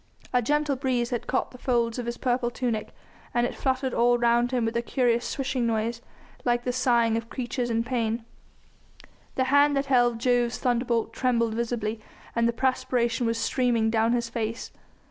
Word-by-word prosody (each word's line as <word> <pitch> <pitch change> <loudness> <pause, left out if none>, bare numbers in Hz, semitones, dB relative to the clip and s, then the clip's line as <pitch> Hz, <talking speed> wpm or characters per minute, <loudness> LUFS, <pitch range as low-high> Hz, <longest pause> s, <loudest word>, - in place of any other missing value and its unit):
A 250 - +4
gentle 295 +3 +1
breeze 250 -3 -1
had 240 - -3
caught 260 - -1
the 250 - -13
folds 235 -2 0
of 240 - -4
his 235 - -3
purple 245 -1 0
tunic, 235 -3 -2 0.5
and 240 0 +3
it - - -3
fluttered 260 -1 -1
all 240 +1 +3
round 240 0 +3
him 245 -2 0
with 225 +1 -2
a 235 - +1
curious 240 -1 +1
swishing 265 -3 -1
noise, 230 +1 -1 0.4
like 240 0 +1
the 250 - -1
sighing 235 -3 +2
of 230 0 -5
creatures 245 -1 -3
in 230 0 +1
pain. 230 -2 -2 1.1
The 260 - +2
hand 285 0 +5
that 275 - 0
held 245 -3 +3
Jove's 245 0 +1
thunderbolt 235 -2 0
trembled 235 -3 +1
visibly, 230 -1 -2 0.4
and 235 0 +3
the - - +2
perspiration 250 -1 0
was 230 0 0
streaming 230 -2 +1
down 225 +1 +2
his 235 -1 0
face. 230 0 -4
240 Hz, 180 wpm, -26 LUFS, 230-255 Hz, 1.1 s, hand